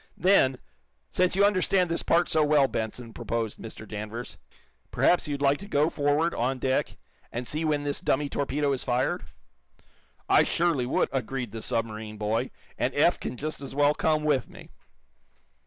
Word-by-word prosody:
"Then, 150 -9 +4 0.5
since 180 0 +2
you 200 +1 +5
understand 185 -3 +2
this 170 - -1
part 170 +1 +2
so 155 - +2
well, 145 -2 +4
Benson," 115 0 -4
proposed 115 -2 -3
Mr. 110 -1 -9
Danvers, 110 +3 -6 0.5
"perhaps 175 - +2
you'd 145 -1 -3
like 140 +1 +3
to 200 - -9
go 150 -3 +2
forward, 150 +3 +1
on 130 +3 -1
deck, 130 +1 -1 0.3
and 120 +1 -4
see 155 +2 -1
when 150 -2 0
this 145 0 -2
dummy 145 +2 +1
torpedo 140 +1 -1
is 130 - -3
fired?" 125 -4 0 1.0
"I - - +6
surely 165 -8 +1
would," - - +1
agreed 130 -3 -3
the 115 - -6
submarine 110 -1 -3
boy 105 +2 -1 0.3
"And - - 0
Eph - - +3
can - - -5
just 155 +3 -4
as 135 -1 -7
well 145 +1 +4
come 155 0 +1
with 145 -5 +1
me." - - -13
140 Hz, 170 wpm, -27 LUFS, 120-155 Hz, 1.0 s, I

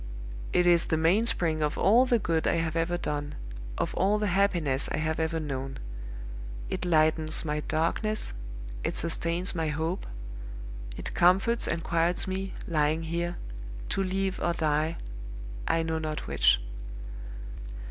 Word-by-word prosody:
It 180 - +4
is 175 -1 +5
the 160 - +1
mainspring 165 -2 +3
of 150 0 0
all 240 +6 +5
the 245 -2 +4
good 165 -6 +1
I - - +3
have 165 -1 0
ever 165 +1 +1
done, 145 -3 -3 0.4
of - - -1
all 200 +3 +3
the 210 - 0
happiness 170 -9 +2
I - - 0
have 155 +1 0
ever 160 0 0
known; 135 -3 -3 0.9
it - - -1
lightens 155 -1 +3
my 150 0 0
darkness, 170 - 0 0.5
it - - -1
sustains 170 +2 +2
my 165 -3 0
hope; 160 +4 -1 0.9
it - - -5
comforts 195 +7 +4
and 170 -1 -1
quiets 170 +1 +2
me, 190 +1 -3
lying 155 0 +2
here, 170 +2 -2 0.5
to - - +1
live 190 0 -1
or 170 - +1
die, 155 0 +1 0.7
I 165 - +3
know 160 0 -1
not 155 -1 -3
which. - - +4
165 Hz, 145 wpm, -29 LUFS, 155-180 Hz, 0.9 s, is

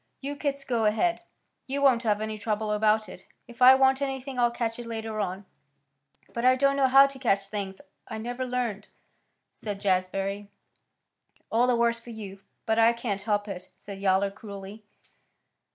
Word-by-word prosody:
You 280 +1 -5
kits 280 -1 -3
go 235 -4 0
ahead. 225 +12 +1 0.5
You 275 +1 -2
won't 255 -4 +5
have 210 -3 0
any 215 0 -4
trouble 215 0 -2
about 215 0 +2
it. - - -12 0.2
If 240 +1 -15
I 255 +1 +9
want 265 0 +3
anything 270 -1 -3
I'll 240 0 +4
catch 235 -1 -3
it 240 - -7
later 220 -1 -4
on." 190 0 -3 0.9
"But 235 - -3
I 255 +1 +6
don't 275 +1 +2
know 275 -1 +3
how 270 +1 +8
to 275 -1 -6
catch 200 -6 0
things. 195 -2 -5 0.3
I 220 - -6
never 245 +3 -4
learned," 245 -5 -3 0.7
said 205 -2 -6
Jazbury. 195 +1 -1 1.0
"All 235 +3 +3
the 250 - +3
worse 235 0 +1
for 230 - -14
you, 205 -4 -8 0.3
but 220 0 +1
I 230 +1 +6
can't 230 -4 -3
help 205 0 -1
it," 185 -3 -7
said 200 -1 -9
Yowler 195 0 +2
cruelly. 200 +1 -10
225 Hz, 175 wpm, -27 LUFS, 205-250 Hz, 1.0 s, I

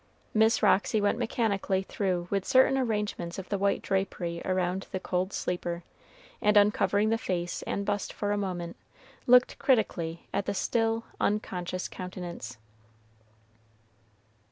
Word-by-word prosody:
Miss 220 +1 +3
Roxy 215 +2 +4
went 205 +3 +1
mechanically 205 -5 0
through 185 -3 -1
with 195 -1 +1
certain 260 +5 +5
arrangements 210 -8 -1
of 190 - -7
the 200 - 0
white 200 0 +1
drapery 180 -3 -2
around 185 0 -1
the 190 - -2
cold 185 +1 -1
sleeper, 175 -2 -3 0.6
and 210 0 +4
uncovering 205 0 +3
the 225 0 +1
face 175 -7 -2
and 200 - -2
bust 205 -1 -1
for 205 -1 -2
a - - +2
moment, 180 -4 -3 0.5
looked 250 0 +5
critically 170 -10 +1
at 200 - -1
the 200 - -1
still, 225 +2 +1 0.2
unconscious 185 -3 -1
countenance. 175 -9 -7
195 Hz, 130 wpm, -29 LUFS, 180-215 Hz, 0.6 s, certain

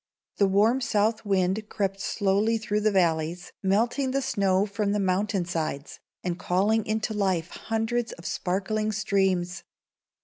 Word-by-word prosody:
The 200 - +4
warm 215 +7 +3
south 215 -1 +1
wind 195 +2 +1
crept 195 -1 -2
slowly 205 +3 +1
through 210 -1 -1
the 215 - +3
valleys, 170 -2 0
melting 230 +7 +1
the 275 +1 0
snow 195 -5 +2
from 200 0 -1
the 210 - +1
mountain 195 0 0
sides, 155 -4 -4 0.2
and 175 -1 -2
calling 205 +5 +1
into 220 +1 -1
life 190 -5 0
hundreds 225 +1 -2
of 170 - -13
sparkling 205 +6 -1
streams. 190 -3 0
200 Hz, 140 wpm, -26 LUFS, 185-215 Hz, 0.2 s, The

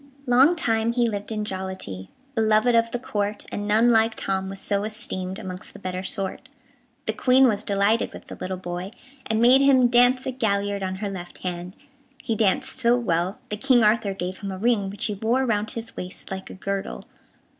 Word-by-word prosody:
Long 265 +7 +5
time 225 -7 +1
he 240 -1 +2
lived 205 -1 -4
in 215 -1 -2
jollity, 190 - -6 0.2
Beloved 220 +1 +3
of 230 0 +3
the 245 - -2
Court, 210 -4 -3
And 205 0 -4
none 225 +3 +4
like 225 0 +3
Tom 190 0 -2
was 195 0 -6
so 200 0 0
esteemed 210 -4 -3
Amongst 185 -4 -6
the - - -10
better 185 -1 -4
sort. 195 +7 -2 0.6
The 220 - -1
Queen 255 +3 +5
was 210 -4 +1
delighted 200 +3 +1
with - - -11
the - - -9
little 185 0 -3
boy, 180 +2 -6 0.3
and 220 -1 0
made 250 +3 +6
him 265 -3 +5
dance 245 +2 +4
a - - -1
gaillard 205 -5 -1
on 190 0 -2
her - - -1
left 175 -2 -9
hand. 180 0 -5 0.5
He 230 - -1
danced 230 +6 0
so 240 -1 +4
well 185 -3 0
that 210 -1 -5
King 255 -4 +4
Arthur 210 -2 +2
gave 185 0 -4
him 200 -2 -5
a 190 - -5
ring, 210 -2 +1
which 200 +4 -3
he 215 - -1
wore 230 +6 +1
round 215 -2 0
his 230 0 -7
waist 180 +1 -6
like 190 0 -5
a - - -9
girdle. 195 +1 -4
210 Hz, 200 wpm, -24 LUFS, 190-235 Hz, 0.6 s, made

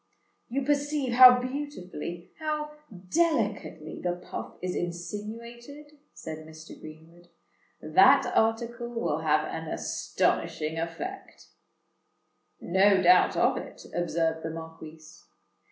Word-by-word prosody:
"You 270 +3 -1
perceive 290 -2 0
how 250 0 +10
beautifully—how 280 - -5 0.4
delicately 215 - -1
the 175 -1 0
puff 180 - -8
is 180 0 -3
insinuated," 230 - -6 0.2
said 160 -1 -7
Mr. 155 0 -12
Greenwood. 160 +3 -13 0.6
"That - - +6
article 235 +2 0
will 230 -10 -2
have 155 -1 +2
an 160 0 -6
astonishing 155 +1 -1
effect." 350 - -7 1.1
"No 190 +1 +3
doubt 180 +1 +5
of - - +3
it," - - -9
observed 165 -1 -1
the 160 - -4
Marquis. 160 -1 -9
185 Hz, 100 wpm, -28 LUFS, 160-250 Hz, 1.1 s, how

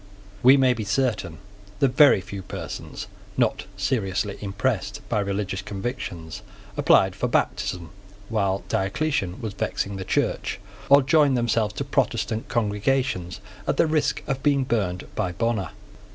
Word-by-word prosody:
We 130 +3 +8
may 130 -2 +4
be 110 -3 -4
certain 105 -6 -1 0.4
that 135 - +3
very 145 -9 +7
few 100 +1 -7
persons, 95 - -6 0.3
not - - +1
seriously 100 -2 -1
impressed 100 0 -1
by 110 - +1
religious 100 -1 -2
convictions, 95 - -5 0.3
applied - - +4
for - - -1
baptism 85 -3 -1 0.4
while 100 -3 0
Diocletian 95 - -1
was 110 -3 -4
vexing 100 0 -2
the 95 - -4
Church, - - -1 0.3
or 140 0 +7
joined 140 -1 +4
themselves 115 -3 +1
to - - -2
Protestant 110 +1 -1
congregations 110 -4 0 0.3
at - - +1
the - - +5
risk 155 -1 0
of 135 -1 -2
being 140 -1 +3
burned 100 -8 -1
by 90 - -1
Bonner. 115 0 -1
105 Hz, 135 wpm, -24 LUFS, 95-130 Hz, 0.4 s, We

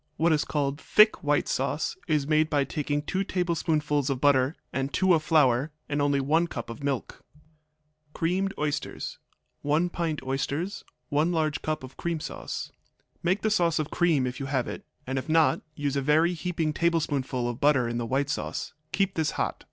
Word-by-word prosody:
What 165 +1 +3
is 150 - +1
called 145 -1 -1
thick 215 +1 +5
white 145 0 +2
sauce 135 +3 -1
is 150 -3 +1
made 155 +1 +2
by 145 -2 +2
taking 145 +1 -2
two 190 +5 -1
tablespoonfuls 155 -6 0
of 135 -2 -1
butter 140 +1 +3 0.2
and 135 +1 -1
two 190 -1 +3
of 160 - +3
flour, 145 -2 +3 0.2
and 145 0 -1
only 145 -1 +2
one 160 +5 +2
cup 120 -7 -6
of 115 - -9
milk. 140 -4 -3 0.9
Creamed 185 +5 0
Oysters 145 -1 -3 0.4
1 150 +5 +1
pint 160 -5 -2
oysters. 140 +8 -2 0.3
1 155 +3 +2
large 155 -3 0
cup 155 -3 -2
of 130 - -10
cream 170 -2 -2
sauce. - - -5 0.5
Make 185 +4 0
the 215 - +2
sauce 170 -6 +2
of 155 -1 -2
cream 165 -7 +2
if 125 +2 -4
you 135 - -4
have 135 -3 0
it, - - -6 0.2
and 130 +1 -1
if 130 - -8
not 160 0 +4
use 145 -2 -1
a 140 - +1
very 155 +5 +3
heaping 165 -3 -2
tablespoonful 145 -7 0
of 120 0 -4
butter 140 -4 +4
in 120 0 -2
the 115 - -3
white 140 +3 0
sauce. - - -4 0.2
Keep 195 -1 +1
this 160 -3 0
hot. - - -1
150 Hz, 185 wpm, -27 LUFS, 140-165 Hz, 0.9 s, thick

